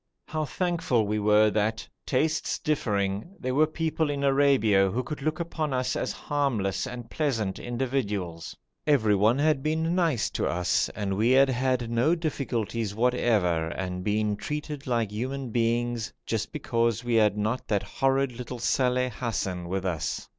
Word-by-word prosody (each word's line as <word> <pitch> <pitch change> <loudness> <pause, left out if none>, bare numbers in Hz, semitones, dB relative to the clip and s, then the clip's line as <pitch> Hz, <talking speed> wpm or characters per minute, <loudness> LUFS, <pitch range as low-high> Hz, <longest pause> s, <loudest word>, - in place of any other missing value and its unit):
How 155 -1 -1
thankful 165 - 0
we 105 +1 -1
were 105 +1 +4
that, 110 +2 -1 0.2
tastes 155 +4 0
differing, 105 - -1
there 130 0 -2
were 155 +3 +4
people 160 -1 -1
in 140 -1 -2
Arabia 135 -8 +4
who 125 +6 -1
could 150 +3 -6
look 155 +3 -1
upon 160 -4 -2
us 130 0 0
as - - -1
harmless 115 -10 -1
and 120 -1 -7
pleasant 115 -11 -1
individuals. 115 -9 -3 0.3
Everyone 110 -4 +4
had 150 -1 +2
been 160 +3 0
nice 165 - +1
to - - -1
us, 90 +1 +1
and 100 -2 -2
we 110 +4 +2
had 135 +1 +6
had 125 -2 0
no 125 +9 +3
difficulties 115 - -2
whatever, 110 -9 +2
and 90 +1 -4
been 105 +1 0
treated 150 +2 -5
like 115 -4 0
human 130 +3 -4
beings, 120 0 0
just 110 -2 -2
because 115 -5 0
we 120 -1 -1
had 105 -2 +4
not 110 +4 -1
that 100 -2 +1
horrid 135 +6 +1
little 125 +1 -7
Saleh 125 +1 +1
Hassan 95 -6 -3
with 95 0 -2
us. 85 -5 -2
120 Hz, 155 wpm, -27 LUFS, 105-140 Hz, 0.3 s, had